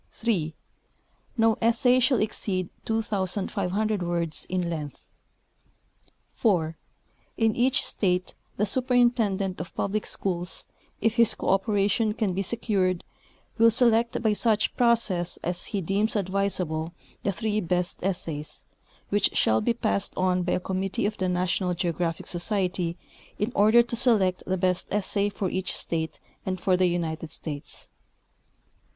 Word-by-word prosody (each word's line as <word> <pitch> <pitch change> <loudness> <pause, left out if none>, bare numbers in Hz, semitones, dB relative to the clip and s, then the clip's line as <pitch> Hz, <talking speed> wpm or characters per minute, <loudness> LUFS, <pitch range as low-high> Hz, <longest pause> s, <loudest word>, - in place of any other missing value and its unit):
3. 175 -9 -1 0.8
No 225 -1 +3
essay 235 +2 +4
shall 255 +1 +3
exceed 185 -4 -1 0.2
2,000 205 -1 -1
words 170 -2 -2
in 180 -1 -1
length. 155 -4 -6 1.2
4. 165 -8 +1 0.6
In 225 -1 +2
each 250 +2 +2
state 180 -2 0 0.2
the 210 - +2
Superintendent 235 -5 +1
of - - -9
Public 205 +2 -1
Schools, 180 -2 -3 0.4
if 225 0 +1
his 235 -2 +5
cooperation 205 +2 +1
can 210 -5 0
be 190 - -1
secured, 190 -4 0 0.6
will 230 0 +7
select, 235 0 +3
by 220 -2 +3
such 215 0 +1
jirocess 225 -8 +2
as 175 +1 -2
he 200 - -2
deems 200 +6 0
advisable, 185 -4 -1 0.3
the 200 - 0
three 215 +2 -1
best 180 -1 -1
essays, 165 -5 -3 0.5
which 205 -1 +2
shall 110 0 +3
be 235 - +1
passed 215 -4 -1
on 185 -1 +2
by 180 0 0
a - - +1
committee 190 +2 -2
of 210 +1 -1
the 185 -1 0
National 180 0 0
Geographic 170 -2 -2
Society 180 -2 -1 0.4
in 210 +4 -1
order 220 +4 +6
to 235 0 -4
select 215 -7 +2
the 185 +1 0
best 180 0 0
essay 205 0 0
for 200 -1 -3
each 190 0 -1
state 160 -1 -3 0.3
and 185 -1 -3
for 185 +1 +2
the 185 0 +3
United 165 -2 -2
States. 145 -3 -5
195 Hz, 135 wpm, -26 LUFS, 180-220 Hz, 1.2 s, will